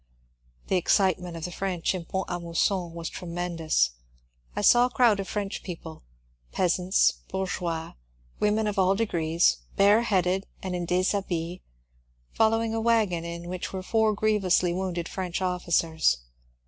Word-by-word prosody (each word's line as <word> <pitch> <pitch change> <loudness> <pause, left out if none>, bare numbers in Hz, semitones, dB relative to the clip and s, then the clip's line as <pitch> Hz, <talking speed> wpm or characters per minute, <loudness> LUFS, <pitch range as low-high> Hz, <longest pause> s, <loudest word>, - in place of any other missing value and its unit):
The 190 - +1
excitement 180 -2 +1
of 160 - -5
the 180 - -5
French 185 -2 -1
in 180 -3 -5
Pont 190 +3 -2
a 175 - -3
Mousson 170 +1 -1
was 165 -1 -4
tre 180 - -7
mendous. 165 - 0 0.6
I - - -1
saw 245 +1 +6
a - - -9
crowd 240 -5 +3
of 195 - -3
French 205 -1 -3
people 165 -3 -8 0.3
— - - -38
peasants, 180 +1 +2
bour 190 0 -2
geois, 165 -3 -3 0.5
women 210 +1 +2
of 205 -1 -1
all 190 +1 +4
degrees, 165 - +2 0.2
bareheaded 195 -3 +3 0.2
and 185 -1 -3
in 175 -1 -3
dishabille 180 -1 -1 0.4
— - - -35 0.3
following 225 0 +2
a 225 - -1
wagon 220 -7 +2
in 170 0 -6
which 180 0 -5
were 190 -1 -5
four 220 +1 +2
grievously 195 -4 +2
wounded 180 -2 -3
French 180 -3 -3
officers. 170 - +1
180 Hz, 155 wpm, -27 LUFS, 170-200 Hz, 0.6 s, saw